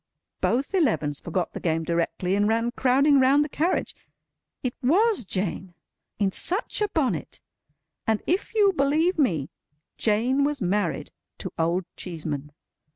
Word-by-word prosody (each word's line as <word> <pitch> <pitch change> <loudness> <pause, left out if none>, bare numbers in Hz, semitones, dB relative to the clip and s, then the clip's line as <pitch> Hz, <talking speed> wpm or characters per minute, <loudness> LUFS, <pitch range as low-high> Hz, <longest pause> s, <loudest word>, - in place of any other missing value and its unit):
Both 270 +9 0
Elevens 220 - +1
forgot 175 +1 -3
the - - -5
game 165 -1 0
directly, 170 +2 -1
and 205 +1 +2
ran 230 +2 +1
crowding 270 +3 +4
round 275 +3 +4
the - - -7
carriage. 335 +6 0 0.7
It 250 -2 -1
was 370 - +3
Jane! 185 -1 -3 0.4
In 200 -2 +1
such 380 - -2
a 420 - +3
bonnet! 250 - -1 0.7
And 220 -1 +1
if 375 +5 -1
you'll 405 -3 +5
believe 315 +4 +2
me, 165 - +1 0.5
Jane 240 +6 +2
was 290 0 0
married 190 -1 -1 0.3
to - - -5
Old 170 +3 +1
Cheeseman. 150 -4 -5
235 Hz, 140 wpm, -25 LUFS, 180-290 Hz, 0.7 s, you'll